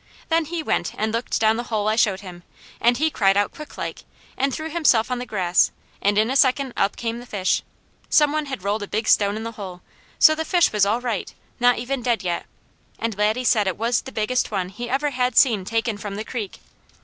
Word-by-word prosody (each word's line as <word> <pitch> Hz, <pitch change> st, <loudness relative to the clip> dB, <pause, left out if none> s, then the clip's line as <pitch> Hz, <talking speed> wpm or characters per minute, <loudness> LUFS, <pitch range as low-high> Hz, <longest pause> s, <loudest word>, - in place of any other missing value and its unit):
Then 325 Hz, 0 st, +2 dB
he 330 Hz, +1 st, -4 dB
went -, -, -1 dB
and 215 Hz, +1 st, -1 dB
looked 230 Hz, +2 st, -1 dB
down 220 Hz, 0 st, +3 dB
the 240 Hz, -, -4 dB
hole 215 Hz, -2 st, 0 dB
I 215 Hz, -, +2 dB
showed 205 Hz, -4 st, +2 dB
him 180 Hz, -3 st, -10 dB, 0.4 s
and 240 Hz, +1 st, +3 dB
he 315 Hz, +3 st, +1 dB
cried 195 Hz, -5 st, +3 dB
out 205 Hz, -, +1 dB
quicklike, 305 Hz, -1 st, -7 dB, 0.3 s
and 275 Hz, +1 st, 0 dB
threw 315 Hz, +3 st, -4 dB
himself 260 Hz, -8 st, +3 dB
on 250 Hz, -, -1 dB
the 250 Hz, -, -6 dB
grass, 180 Hz, -4 st, +2 dB, 0.3 s
and 205 Hz, +1 st, +2 dB
in 220 Hz, +3 st, +3 dB
a -, -, -1 dB
second 265 Hz, -1 st, +3 dB
up 200 Hz, -, +1 dB
came 230 Hz, 0 st, -3 dB
the 245 Hz, -, -10 dB
fish. 195 Hz, -5 st, 0 dB, 0.5 s
Some 295 Hz, -1 st, +4 dB
one 305 Hz, -1 st, -1 dB
had 265 Hz, -9 st, -6 dB
rolled 205 Hz, +2 st, -1 dB
a 205 Hz, -, -5 dB
big 215 Hz, +2 st, -2 dB
stone 205 Hz, 0 st, +3 dB
in 220 Hz, -, -5 dB
the 230 Hz, -, -4 dB
hole, 190 Hz, -5 st, -8 dB, 0.4 s
so 310 Hz, -, +7 dB
the 315 Hz, +1 st, -2 dB
fish 345 Hz, -, +2 dB
was 205 Hz, -2 st, +3 dB
all 225 Hz, +4 st, +1 dB
right, 235 Hz, -6 st, -3 dB, 0.3 s
not 245 Hz, 0 st, +4 dB
even 260 Hz, +1 st, -3 dB
dead 235 Hz, -3 st, 0 dB
yet, 175 Hz, -1 st, -2 dB, 0.5 s
and 230 Hz, -2 st, -2 dB
Laddie 215 Hz, +5 st, +1 dB
said 215 Hz, -4 st, +3 dB
it 185 Hz, -, -1 dB
was 230 Hz, +1 st, +1 dB
the 265 Hz, -, -10 dB
biggest 225 Hz, +3 st, 0 dB
one 190 Hz, -4 st, -2 dB
he 240 Hz, +5 st, -7 dB
ever 285 Hz, +3 st, 0 dB
had 250 Hz, -2 st, -1 dB
seen 220 Hz, -8 st, +4 dB
taken 225 Hz, 0 st, -1 dB
from 205 Hz, -1 st, -6 dB
the 215 Hz, +2 st, -5 dB
creek. 220 Hz, -6 st, -5 dB
230 Hz, 230 wpm, -23 LUFS, 205-255 Hz, 0.5 s, so